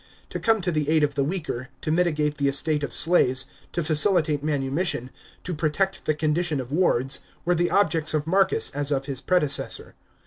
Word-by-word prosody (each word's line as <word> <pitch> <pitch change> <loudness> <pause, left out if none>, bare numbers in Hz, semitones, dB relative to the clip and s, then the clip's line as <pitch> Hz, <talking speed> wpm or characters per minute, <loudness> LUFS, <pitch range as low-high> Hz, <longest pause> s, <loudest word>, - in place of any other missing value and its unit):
To - - -4
come 225 -3 +2
to 180 0 -1
the 155 -2 -1
aid 155 -1 +3
of 145 -1 +1
the 140 - 0
weaker, 145 -6 -4
to 155 - -2
mitigate 155 -3 0
the 140 - +1
estate 150 +2 0
of 145 - -4
slaves, 130 -6 +3 0.3
to 170 - -2
facilitate 155 -2 +3
manumission, 140 -2 -1 0.3
to 180 - -4
protect 170 +5 -1
the 155 - +1
condition 155 0 -1
of 130 0 -7
wards, 135 -5 +2 0.3
were 175 - +2
the 175 0 +1
objects 165 -6 +1
of 150 -1 -1
Marcus 190 +3 +2
as 145 +1 -3
of 135 -1 -1
his 135 -3 -3
predecessor. 160 -6 0
155 Hz, 185 wpm, -24 LUFS, 140-175 Hz, 0.3 s, aid